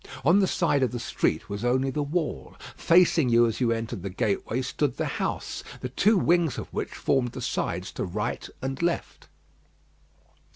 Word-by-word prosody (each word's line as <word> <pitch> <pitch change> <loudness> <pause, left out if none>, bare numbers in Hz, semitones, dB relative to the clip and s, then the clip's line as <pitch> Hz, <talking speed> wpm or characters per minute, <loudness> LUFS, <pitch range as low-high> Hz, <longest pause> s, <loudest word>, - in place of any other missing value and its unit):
On 170 +7 +6
the 195 - +3
side 165 -7 +1
of 130 - +2
the 120 - -4
street 80 -7 -1
was 100 +1 -5
only 130 +2 +1
the 150 - -2
wall; 145 - -3 0.2
facing 165 -5 +4
you 120 0 +5
as 115 +2 -2
you 120 -2 +3
entered 115 -2 -3
the 100 - -4
gateway 110 +6 -1
stood 140 +2 -1
the - - -1
house, - - -3 0.2
the 125 - -3
two 205 - +3
wings 170 -4 +2
of - - -5
which - - -2
formed 125 -3 0
the - - -6
sides 90 +3 -2
to - - -4
right 105 +4 -3
and 135 +2 -3
left. 170 0 -2
130 Hz, 180 wpm, -26 LUFS, 115-165 Hz, 0.2 s, On